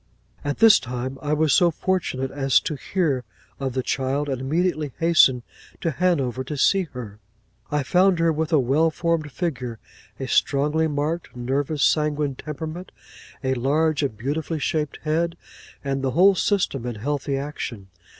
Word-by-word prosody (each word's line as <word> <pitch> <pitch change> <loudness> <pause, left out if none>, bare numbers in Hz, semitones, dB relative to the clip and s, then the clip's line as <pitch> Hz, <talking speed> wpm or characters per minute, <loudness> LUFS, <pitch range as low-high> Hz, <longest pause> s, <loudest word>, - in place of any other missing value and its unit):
'At 145 -1 -2
this 225 -1 +7
time, 125 +2 -5
I 150 0 -1
was 150 -1 +3
so 175 - +5
fortunate 165 -6 -1
as 135 -2 +3
to - - -3
hear 145 -3 -1 0.4
of 135 -2 -2
the 130 0 -1
child, 135 +3 -1
and 130 -2 -2
immediately 155 0 0
hastened 155 -7 +4 0.4
to 165 - -1
Hanover 140 -7 0
to 145 +3 -5
see 190 +6 +3
her. 110 -5 -8 0.5
I 150 -1 0
found 180 +6 +3
her 165 -1 +2
with 160 +1 -2
a 160 - +5
well 140 +5 +3
formed 160 -2 -1
figure; 130 -9 -3 0.4
a - - -4
strongly 150 +3 +2
marked, 155 +2 -3
nervous 135 +4 -1
sanguine 150 -2 +2
temperament; 160 +6 -7 0.5
a 130 0 +1
large 145 +4 +1
and 135 -7 -2
beautifully 150 +7 -2
shaped 150 0 -1
head; 165 +2 0 0.5
and 135 -1 -1
the 135 - 0
whole 195 +3 +7
system 180 - 0
in 120 - -4
healthy 140 +4 -2
action. 125 -8 -6
145 Hz, 160 wpm, -23 LUFS, 130-160 Hz, 0.5 s, this